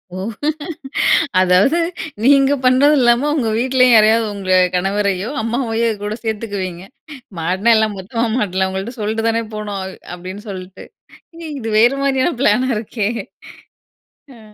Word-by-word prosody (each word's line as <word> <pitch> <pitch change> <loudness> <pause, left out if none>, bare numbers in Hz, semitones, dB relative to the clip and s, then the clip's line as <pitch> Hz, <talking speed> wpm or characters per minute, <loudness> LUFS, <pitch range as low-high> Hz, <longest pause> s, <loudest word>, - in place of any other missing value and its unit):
ஓ! - - -5 1.2
அதாவது 185 - +3 0.4
நீங்க 275 +1 +5
பண்ணதில்லாம, 255 0 +4
உங்க 235 -7 0
வீட்லயும் 255 0 +3
யாரையாவது 220 +1 +4
உங்க 190 -2 -1 0.2
கணவரையோ, 195 +2 -1
அம்மாவையோ 230 0 -1
கூட 210 +1 -3
சேத்துக்குவீங்க. 200 -5 -4 0.6
மாட்னா, 190 +8 +1
எல்லாம் 220 -2 0
மொத்தமா 230 +5 -2
மாட்லாம். 190 -3 0
"உங்கள்ட்ட 195 +6 -5
சொல்ட்டு 220 +2 -1
தானே 230 0 0
போனோம்." 205 -2 -5 0.3
அப்டின்னு 185 +5 -9
சொல்ட்டு. 185 -1 -9 0.7
இது 225 - -6
வேறு 240 +4 +4
மாரியான 270 +4 +1
பிளானா 255 +2 +2
இருக்கே! 215 -1 -3 1.3
அ. - - -16
220 Hz, 115 wpm, -18 LUFS, 195-245 Hz, 1.3 s, நீங்க